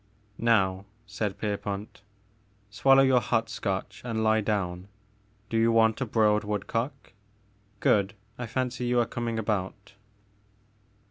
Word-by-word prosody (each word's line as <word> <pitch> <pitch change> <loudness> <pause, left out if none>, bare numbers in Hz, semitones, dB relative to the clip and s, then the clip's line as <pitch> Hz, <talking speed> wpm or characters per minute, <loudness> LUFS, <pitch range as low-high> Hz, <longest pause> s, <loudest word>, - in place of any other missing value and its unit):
Now," 95 -5 +2 0.2
said 105 -1 -3
Pierpont, 100 -1 -4 0.3
'* - - -38 0.3
swallow 135 +5 +5
your 130 -2 +4
hot 115 -1 0
Scotch 95 -2 -3
and 115 -2 -2
lie 110 0 +3
down. 95 -3 -2 0.6
Do 115 - -1
you 115 +1 +4
want 110 +1 +3
a 130 - -1
broiled 105 -1 +3
woodcock? 105 +5 -3 0.7
Good, 100 -1 +2 0.2
I 120 -1 -5
fancy 125 +1 -2
you 120 0 +2
are 120 - +3
coming 115 -1 -3
about." 100 -2 -3
110 Hz, 130 wpm, -27 LUFS, 100-115 Hz, 0.7 s, swallow